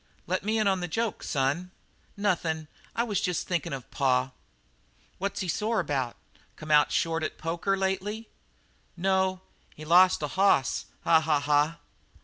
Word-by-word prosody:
"Let 185 +2 -1
me 215 +2 0
in 215 -2 +2
on 190 -1 +2
the 175 - -3
joke, 225 +3 -2
son." 145 +6 -1 0.5
"Nothin'. 165 -6 -1 0.3
I 235 - +1
was 210 -5 -1
just 180 -2 -1
thinkin' 175 -5 -1
of 135 -3 -7
pa." 130 -1 +1 0.9
"What's 200 +2 -2
he 185 - -3
sore 215 +6 0
about? 135 -8 -1 0.4
Come 155 0 -7
out 150 0 +5
short 165 0 0
at 155 - -3
poker 170 +5 -1
lately?" 195 +3 -2 0.7
"No; 190 0 +1 0.3
he 155 - -10
lost 180 +1 +5
a - - 0
hoss. 190 -9 +2 0.2
Ha, 165 -1 +5
ha, 155 -2 +1
ha!" 150 +3 +2
175 Hz, 155 wpm, -28 LUFS, 150-195 Hz, 0.9 s, out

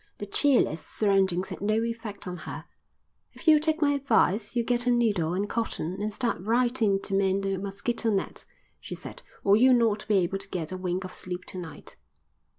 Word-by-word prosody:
The 205 - -5
cheerless 235 - +2
surroundings 190 -3 +1
had - - -7
no 215 +2 +1
effect 230 -3 -5
on 180 0 -5
her. - - -7 0.7
"If - - -14
you'll 310 -1 +8
take 315 +1 +1
my 285 - +4
advice 225 -6 +1
you'll 235 -1 +1
get 245 0 0
a - - +5
needle 205 -9 +1
and 200 +2 -1
cotton 200 -5 -3
and 215 +1 -1
start 230 -4 -2
right 240 +4 +1
in 200 -3 +3
to 195 - -3
mend 195 0 +2
the 195 0 0
mosquito 200 +5 -2
net," 200 -3 -2 0.4
she - - -7
said, - - -10 0.2
"or 200 0 +5
you'll 255 +3 +6
not 225 -4 +1
be 215 - +2
able 190 +1 +1
to 195 0 -11
get 165 -4 -4
a - - -3
wink 185 0 -2
of 185 - -8
sleep 180 0 -6
to 185 - -6
night." 170 -3 -10
205 Hz, 205 wpm, -27 LUFS, 190-235 Hz, 0.7 s, you'll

